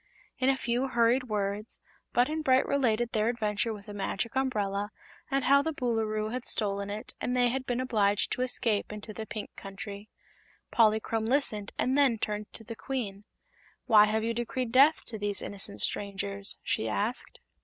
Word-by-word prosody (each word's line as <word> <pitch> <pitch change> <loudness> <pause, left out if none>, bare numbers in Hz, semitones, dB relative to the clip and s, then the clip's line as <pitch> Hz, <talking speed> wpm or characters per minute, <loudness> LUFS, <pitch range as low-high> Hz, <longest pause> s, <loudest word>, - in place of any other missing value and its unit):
In 260 +1 +3
a 270 - +3
few 245 +1 0
hurried 240 +1 +3
words 210 -1 -2 0.3
Button 300 +6 +2
Bright 260 -3 +4
related 240 -4 +1
their 215 +1 +2
adventure 215 -2 -1
with 205 -2 -8
the 205 - -8
Magic 205 +4 -3
Umbrella, 205 -6 0 0.4
and 275 -1 +1
how 280 +2 +6
the 320 +2 -2
Boolooroo 220 -4 -1
had 250 0 -3
stolen 200 -3 -1
it 215 +5 -6
and 250 0 0
they 245 -1 +4
had 260 +1 -3
been 245 0 0
obliged 210 -5 +2
to - - -1
escape 230 -5 0
into 210 +1 -7
the 220 +1 -6
Pink 215 - -6
Country. 200 +1 -8 0.6
Polychrome 220 0 +3
listened 225 -6 +1
and 260 - +1
then 275 -5 +4
turned 210 0 -3
to 225 - -10
the 230 +1 -7
Queen. 215 -7 -4 0.6
"Why 215 -4 +7
have 220 +1 0
you 230 +1 0
decreed 240 +1 -2
death 280 +5 +5
to 220 -2 -7
these 205 -1 -1
innocent 150 - -2
strangers?" 200 0 -2
she 110 - 0
asked. 215 - -2
225 Hz, 175 wpm, -29 LUFS, 205-255 Hz, 0.6 s, Why